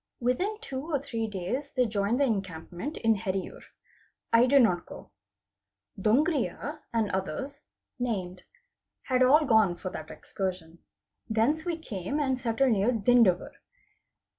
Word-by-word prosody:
Within 360 - 0
two 265 - -5
or 300 - +2
three 230 -5 -3
days 215 +9 -4
they 255 -2 +2
joined 210 +2 0
the - - +4
encampment 190 - -4
in 225 -1 +3
Heriyur. 190 -2 -4 0.7
I 235 +2 +6
did 275 0 +6
not 180 -6 +1
go. - - -11 0.8
Dongriya, 290 - 0
and 225 -3 0
others 265 +9 -4 0.4
(named) 185 -7 -3 0.6
had 255 -1 0
all 295 +5 +6
gone 220 -8 +4
for 185 +1 -6
that 155 -3 -7
excursion. 180 -4 -5 0.5
Thence 240 +9 +1
we 340 -2 -1
came 225 - -4
and 265 -3 0
settled 245 +2 +1
near 210 +2 +2
Dindavar. 225 -5 +3
230 Hz, 135 wpm, -28 LUFS, 190-270 Hz, 0.8 s, I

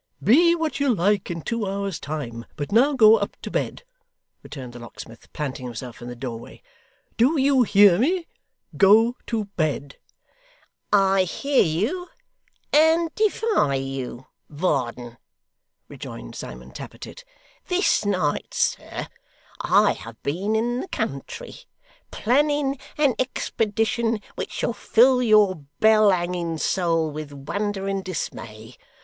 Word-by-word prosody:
'Be 335 - +5
what 320 -2 -2
you 280 -2 +2
like 200 -1 +1
in 165 -2 -5
two 230 -3 -2
hours' 195 -2 -3
time, 125 -6 -5
but 145 +3 -5
now 255 +7 +4
go 225 -4 +7
up 200 -1 -4
to - - -6
bed,' - - -3 0.6
returned 130 -4 -9
the 120 - -9
locksmith, 115 -1 -12
planting 130 -4 -5
himself 120 0 -8
in 120 - -8
the 125 - -7
doorway. 120 -2 -8 0.5
'Do 275 +7 +3
you 270 -1 +4
hear 200 -5 +5
me? 340 +7 +1 0.5
Go 220 +5 +5
to 220 -2 -1
bed!' 145 -4 -2 0.9
'I 195 -1 +4
hear 275 +9 +1
you, 215 - -1 0.7
and 320 +1 +4
defy 430 - +1
you, 135 -2 -5 0.2
Varden,' 125 -7 -2 0.7
rejoined - - -9
Simon 60 +1 -9
Tappertit. - - -10 0.4
'This 365 - +2
night, 185 -8 -1
sir, - - -1 0.5
I - - +4
have 115 0 -11
been 190 +9 -1
in 240 +3 0
the 375 - -5
country, - - -5 0.5
planning 280 +2 +1 0.2
an 290 -4 +3
expedition 225 -2 -1
which - - -5
shall - - -2
fill 250 +3 +4
your 215 -5 +4 0.2
bell 215 -1 +6
hanging 175 -2 -1
soul 165 -2 0
with 150 -1 -7
wonder 195 +8 -3
and 195 -1 -2
dismay. 115 -11 -6
200 Hz, 130 wpm, -23 LUFS, -, 0.9 s, go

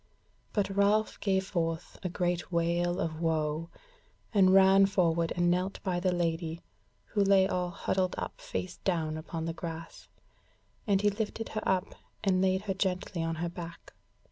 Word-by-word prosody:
But 205 -2 0
Ralph 205 +2 +2
gave 190 -2 +1
forth 165 -3 -3
a 185 - -2
great 175 0 -1
wail 175 +1 +1
of 160 0 -2
woe, 160 0 0 0.6
and 190 -3 +6
ran 195 0 +7
forward 170 -4 +1
and 175 0 +3
knelt 185 +2 -1
by 185 -3 0
the 185 0 +1
Lady, 165 -1 -1 0.5
who 205 - +1
lay 195 -1 +5
all 180 -1 -1
huddled 185 0 -1
up - - -5
face 180 -1 -4
down 160 -4 -1
upon 160 +1 -5
the 165 - -2
grass, 165 -1 -7 0.8
and 200 -1 +3
he 205 - +4
lifted 220 +1 -3
her 215 - -3
up 190 0 0 0.3
and 185 -3 +3
laid 190 0 +2
her 200 -2 -1
gently 185 -2 -1
on 165 0 -1
her 170 +2 -2
back. 170 -1 -9
180 Hz, 165 wpm, -30 LUFS, 165-195 Hz, 0.8 s, ran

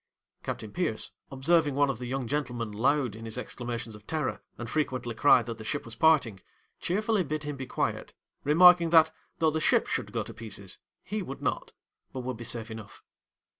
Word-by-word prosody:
Captain 110 - -5
Pierce, 165 -12 -1 0.2
observing 145 +2 +2
one 145 0 +4
of 120 - -7
the 125 - -5
young 130 0 -2
gentlemen 120 -4 -2
loud 125 +1 +1
in 115 - -9
his 110 +1 0
exclamations 120 -2 -5
of 105 0 -13
terror, 155 -4 -2 0.2
and 120 - -5
frequently 130 -3 -1
cry 125 0 +5
that 115 -1 -6
the - - -7
ship - - -3
was 115 - -7
parting, 125 -6 +3 0.4
cheerfully 210 +2 +1
bid 155 -1 -3
him 145 -1 -4
be 130 -1 -6
quiet, - - -2 0.3
remarking 170 +3 +7
that 160 -1 +6 0.3
though 160 -2 +3
the 160 +1 -1
ship - - +3
should - - -3
go - - -1
to - - -9
pieces, 100 -4 -5 0.2
he 215 0 -3
would 140 -7 -7
not, - - -2 0.4
but 130 - -4
would 125 0 -4
be 120 - -7
safe 115 -1 -3
enough. 110 -2 -10
130 Hz, 195 wpm, -29 LUFS, 115-155 Hz, 0.4 s, remarking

